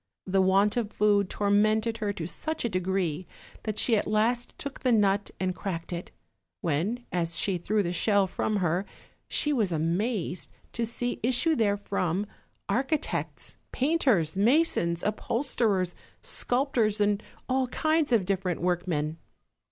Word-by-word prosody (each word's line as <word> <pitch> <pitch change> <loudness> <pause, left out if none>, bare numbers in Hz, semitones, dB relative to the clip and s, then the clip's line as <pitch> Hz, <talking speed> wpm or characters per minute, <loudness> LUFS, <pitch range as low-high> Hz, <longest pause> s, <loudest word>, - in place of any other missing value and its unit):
The 190 0 +2
want 195 +4 +3
of 220 -3 -1
food 205 -2 +2
tormented 215 +2 +2
her 210 -2 -1
to 165 - -5
such 315 - -3
a - - +1
degree 185 -3 -1 0.3
that 215 -1 -4
she 230 - +3
at 210 - 0
last 230 +3 +1
took 280 -2 -6
the 255 - +1
nut 205 -2 +3
and 185 -1 0
cracked 180 -3 -5
it; 175 +1 -5 0.5
when, 180 +10 -1
as 170 -2 0
she 190 0 +1
threw 210 +4 +1
the 175 -1 -2
shell 200 +2 +3
from 210 +3 -2
her, 180 -1 +1 0.4
she 295 - +1
was 215 -9 +1
amazed 175 +4 -1 0.2
to 235 -1 -1
see 245 +1 -2
issue 255 +7 +3
therefrom 200 - 0 0.4
architects, 275 +4 -2
painters, 255 - +2
masons, 200 - +2
upholsterers, 215 -4 0 0.3
sculptors, 245 -5 +1
and 205 0 +2 0.3
all 260 0 +1
kinds 310 +2 +1
of 220 -6 +3
different 185 -2 -1
workmen. 170 -3 -1
205 Hz, 140 wpm, -28 LUFS, 180-235 Hz, 0.5 s, want